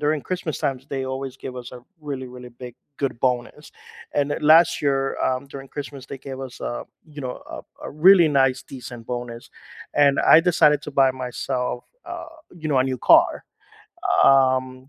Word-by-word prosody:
during 150 0 0
Christmas 175 -4 -4
times, 135 -1 -3
they 135 -1 -3
always 130 0 -5
give 130 -1 -8
us 125 0 -8
a 125 -1 -11 0.2
really, 140 -4 -5
really 125 0 -11
big, 125 0 -11 0.2
good 135 -4 -3
bonus, 125 +3 -2 0.4
and 145 0 0
last 160 +3 +5
year, 135 -1 0
um, 130 +2 -1
during 135 -1 -10
Christmas, 140 -2 -7
they 135 - -8
gave 135 0 -8
us, 130 -2 -9
uh, - - -4 0.2
you 150 -2 -11
know, 125 -1 -6
a - - -8 0.2
a - - -7
really 175 +3 +6
nice, 135 -3 +2
decent 120 -3 -10
bonus, 120 -1 -6 0.4
and 140 -1 +4
I 160 - +7
decided 150 -4 +3
to - - -7
buy 135 -2 +3
myself, 125 -1 -4 0.2
uh, - - -7 0.2
you 165 -3 -8
know, 140 - +2
a - - +4
new 130 -1 -2
car, - - +4 0.8
um, 130 -1 +3
135 Hz, 175 wpm, -23 LUFS, 125-145 Hz, 0.8 s, I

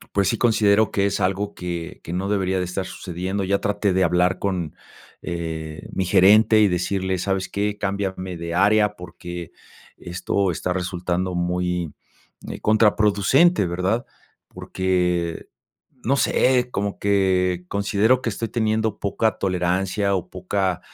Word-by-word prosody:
pues 100 -1 +3
sí 115 - 0
considero 110 -2 +3
que 100 0 +1
es - - -2
algo 100 +2 -1
que 85 -2 -6
que 85 - -7
no 95 +2 -2
debería 95 -2 0
de - - 0
estar 90 +1 -3
sucediendo. 95 +3 -4
Ya 100 +1 +1
traté 100 0 0
de 95 0 +2
hablar 90 +2 +2
con, 90 -6 -2 0.5
eh, 80 -2 -5
mi 95 - -1
gerente 105 +4 +5
y 105 - +5
decirle: 95 +1 -1
"¿Sabes 95 +1 -2
qué?, 105 +1 -2
cámbiame 95 -3 -3
de 85 0 -5
área 105 +2 +3
porque 85 -1 -8 0.5
esto 90 +2 -1
está 90 +2 -3
resultando 90 0 -2
muy, 90 -1 -1 0.5
eh, - - -7
contraproducente, 105 - +3
¿verdad?", 90 +7 -1 0.4
porque, 90 -2 -1 0.6
no 135 +3 +3
sé, 125 -2 +2
como 100 0 -2
que 95 -3 +1
considero 105 +6 +2
que 115 - -1
estoy 115 +2 -3
teniendo 110 -2 -1
poca 105 +1 0
tolerancia 95 +2 0
o 90 - -4
poca 95 -1 -2
95 Hz, 140 wpm, -22 LUFS, 90-100 Hz, 0.6 s, gerente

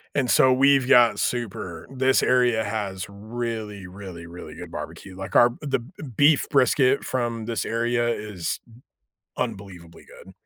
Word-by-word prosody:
And 130 -4 +1
so, 130 +2 +5
we've 135 0 +4
got 120 -5 +6
super 95 -10 -3
this 130 0 +2
area 125 -3 +3
has 100 -3 -4
really, 110 -2 -5
really, 90 -3 -10
really 85 +1 -10
good - - -9
barbecue. 95 -2 -8
Like, 95 0 -7
our 120 0 +6
the 140 -3 -1
b 120 +9 -14 0.2
beef 145 +2 +4
brisket 135 0 +3
from 120 -3 -2
this 115 -2 -2
area 120 +1 0
is 105 -7 -3 0.8
unbelievably 90 -4 -6
good. 95 - -15
115 Hz, 145 wpm, -24 LUFS, 100-125 Hz, 0.8 s, got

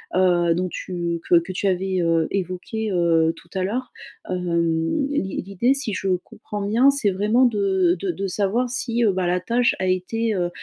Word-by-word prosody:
heu, 175 -2 +3
dont 180 +2 -1
tu 170 -2 -3
que - - +6
que 170 +3 -7
tu 195 - -1
avais, 190 0 0
heu, 165 -1 +2
évoquée, 195 +4 -3
heu, 165 -3 +3
tout 170 - -17
à 190 - 0
l'heure, 245 +7 -3 0.4
hem, 170 - 0
l'i 195 -10 -2
l'idée, 200 +7 +1
si 275 -6 -3
je 195 - -3 0.2
comprends 210 -1 -8
bien, 235 +6 +4
c'est 275 -7 +1
vraiment 210 +7 +2
de 195 -6 +2
de 190 0 -1
de 195 +3 -4
savoir 210 +6 0
si, 240 -1 0
heu, 210 - +4
bah, 185 -1 -1
la 180 +1 +1
tâche 235 +6 +1
a 185 - -1
été, 215 +5 0
heu 175 -2 0
190 Hz, 190 wpm, -22 LUFS, 175-220 Hz, 0.4 s, que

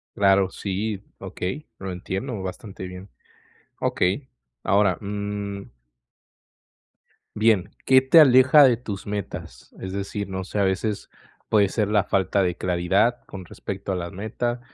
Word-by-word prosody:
Claro 95 -1 +4
sí, 100 +1 -3 0.2
okey, 130 +12 -5
lo 95 -1 -5
entiendo 95 +5 -4
bastante 95 0 -7
bien. 90 +2 -10 0.7
Okey, 100 +10 0 0.4
ahora, 100 -2 +3
mm 100 -3 -5 1.6
bien, 105 -4 +2
¿qué 130 0 +6
te 130 +5 +6
aleja 130 +1 +7
de 125 -4 +6
tus 100 -4 -7
metas? 105 -1 -6
Es 95 0 -5
decir, 100 0 -4
no 95 0 -4
sé, 100 +2 -3
a - - +4
veces 100 +2 -1 0.4
puede 105 -3 +4
ser 105 -1 0
la 105 -1 +2
falta 95 +1 +1
de 90 -1 -1
claridad 95 +7 +1
con 95 -2 -9
respecto 95 +3 -6
a 95 - 0
la 85 -1 -4
meta 120 +5 -3
100 Hz, 140 wpm, -24 LUFS, 95-110 Hz, 1.6 s, aleja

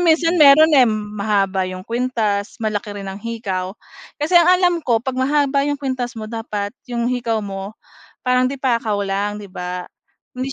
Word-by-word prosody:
minsan 335 0 +3
mayro'n, 300 +3 +8
eh, 255 -2 +7
mahaba 210 -2 -1
'yong 185 0 -6
kuwintas, 230 -3 -1
malaki 210 -1 -2
rin 195 -1 -6
ang 190 - -6
hikaw. 200 -5 -4 0.5
Kasi 335 +4 +2
ang 345 0 +6
alam 360 -1 +3
ko, 235 -3 +2
'pag 255 +2 -4
mahaba 280 +1 +2
'yong 290 0 -2
kuwintas 255 -3 -3
mo, 215 -1 -6
dapat 215 -3 -4 0.2
'yong 240 0 -1
hikaw 235 -3 -1
mo 195 0 -6 0.5
parang 250 0 +3
de-pakaw 235 -6 -1
lang, 205 +2 -2
'di 200 - -10
ba? 180 -1 -6 0.5
Hindi 265 +1 -3
230 Hz, 165 wpm, -20 LUFS, 205-265 Hz, 0.5 s, mayro'n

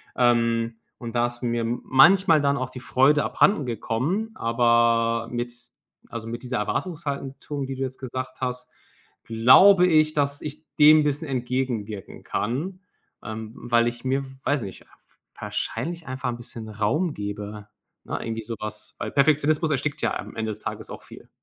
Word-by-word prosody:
Ähm, 115 -2 +2 0.2
und 120 -1 -7
da 120 0 +3
ist 120 0 -10
mir 120 -1 0
manchmal 160 - +5
dann 140 0 +2
auch 130 0 -3
die 130 - -9
Freude 145 +4 +3
abhandengekommen, 150 - 0
aber 115 -1 +2
mit 120 0 -3 0.6
also, 115 -1 -6
mit 120 +2 -6
dieser 125 -1 -2
Erwartungshaltung, 140 - -3
die 135 - -4
du 130 - -7
jetzt 130 0 -4
gesagt 130 0 -6
hast, 125 -1 -3 0.5
glaube 180 - +6
ich, 155 -2 +4
dass 145 -1 0
ich 150 +1 -6
dem 155 +1 +7
bisschen 150 +2 -1
entgegenwirken 125 -5 -3
kann, 165 - -3 0.4
ähm, 110 0 -6
weil 120 -1 +2
ich 120 0 -4
mir, 135 +1 +1 0.2
weiß 145 -3 +1
ich - - -4 0.2
nicht, - - -20 0.5
wahrscheinlich 170 0 -4
einfach 130 0 -3
’n 120 - -4
bisschen 115 -2 -8
Raum 135 - 0
gebe, 105 0 -6 0.4
ne, - - -3
irgendwie 115 -1 -4
so 115 - -5
was, 105 0 -7
weil - - -3
Perfektionismus 155 +2 +2
erstickt 145 +2 -1
ja - - 0
am - - -8
Ende 110 -1 -2
des 105 - -7
Tages - - -6
auch - - -8
viel. - - -14
125 Hz, 160 wpm, -24 LUFS, 115-145 Hz, 0.6 s, dem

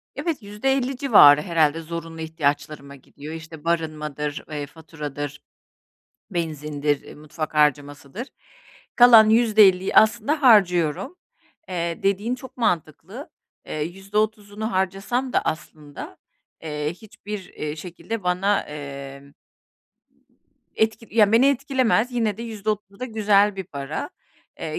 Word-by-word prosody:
Evet, 330 -6 -3
%50 260 +5 -1
civarı 205 - +7
herhâlde 165 -2 +1
zorunlu 165 0 -7
ihtiyaçlarıma 145 -2 -3
gidiyor. 145 +3 -11
İşte, 160 -1 -10
barınmadır, 150 -3 -3
eee, 150 -1 -4
faturadır, 150 -2 -7 0.9
benzindir, 150 -4 -2
ııı, - - -11
mutfak 155 +1 -6
harcamasıdır. 145 - 0 0.7
Kalan 235 -3 +8
%50 210 -5 +4
aslında 235 +8 +3
harcıyorum. 195 - +3 0.5
Eee, 170 -1 -3
dediğin 200 +5 0
çok 260 +1 -12
mantıklı. 195 - -3 0.4
Eee, 155 - -5
%30'unu 205 +4 -3
harcasam 195 +7 -1
da - - +2
aslında, 150 -2 -6 0.5
eee, 150 -1 -3
hiçbir, 210 0 -9
eee, 150 0 -5
şekilde 185 +6 -6
bana, 185 +3 +1
emm 140 -1 -9 1.4
etki, 220 +1 0
ya, 210 -1 +4
beni 235 +4 +5
etkilemez, 260 -3 +1
yine 220 -4 0
de 230 - -7
%30 210 -3 -4
da - - -2
güzel 210 -3 +2
bir 190 - -4
para. 140 -5 -5 0.5
Eee, - - -4
180 Hz, 110 wpm, -23 LUFS, 150-220 Hz, 1.4 s, Kalan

